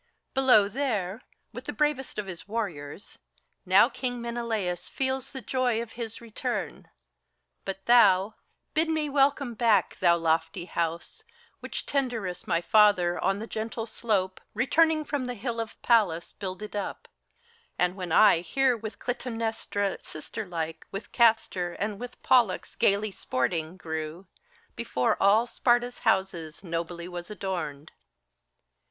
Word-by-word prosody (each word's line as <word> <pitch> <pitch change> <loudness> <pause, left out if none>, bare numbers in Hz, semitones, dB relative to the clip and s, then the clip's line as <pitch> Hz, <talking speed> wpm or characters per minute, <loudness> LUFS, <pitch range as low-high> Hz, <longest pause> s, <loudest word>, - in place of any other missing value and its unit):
Below 255 -6 +5
there, 215 -4 -2 0.3
with - - -8
the - - -4
bravest 295 -3 0
of 210 - -2
his 185 -1 -8
warriors, 195 -7 -5 0.5
now - - +7
King 245 -2 -4
Menelaus 225 -7 -3
feels 265 0 -2
the 265 -3 -7
joy 250 -3 +1
of 230 -1 -5
his 230 -2 -6
return; 230 -2 -4 0.8
But 195 0 -5
thou, 210 -4 +5 0.4
bid 320 +1 +2
me 310 -2 0
welcome 280 -2 +2
back, 225 -1 +2
thou 170 -2 +5
lofty 165 +1 0
House 170 -1 -3 0.4
Which - - -5
Tyndarus, 235 -10 -2
my 170 - +1
father, 185 -4 +4
on 195 - +2
the 215 - -5
gentle 225 0 -4
slope, 200 -5 -1
Returning 310 +6 +3
from 285 -3 -2
the 250 0 -4
Hill 230 +1 -3
of 225 -1 -5
Pallas, 200 -9 +2
builded 200 +2 -6
up; 205 - -4 0.7
And 180 +1 +1
when 180 -3 -5
I 195 -1 +6
here 255 +9 +2
with 220 -1 -7
Clytemnestra 225 -4 -2
sister 200 +7 -7
like, 165 -2 -4
With 195 - -7
Castor 220 -7 +2
and 205 -1 -3
with 245 0 -8
Pollux 235 -7 +3
gayly 205 +1 +2
sporting, 160 +3 -2
grew, 160 +1 -5 0.5
Before 125 - 0
all 210 +4 +5
Sparta's 245 0 +1
houses 180 -4 0
nobly 170 0 -4
was 175 -1 -7
adorned. 170 -8 -4
210 Hz, 135 wpm, -27 LUFS, 180-240 Hz, 0.8 s, now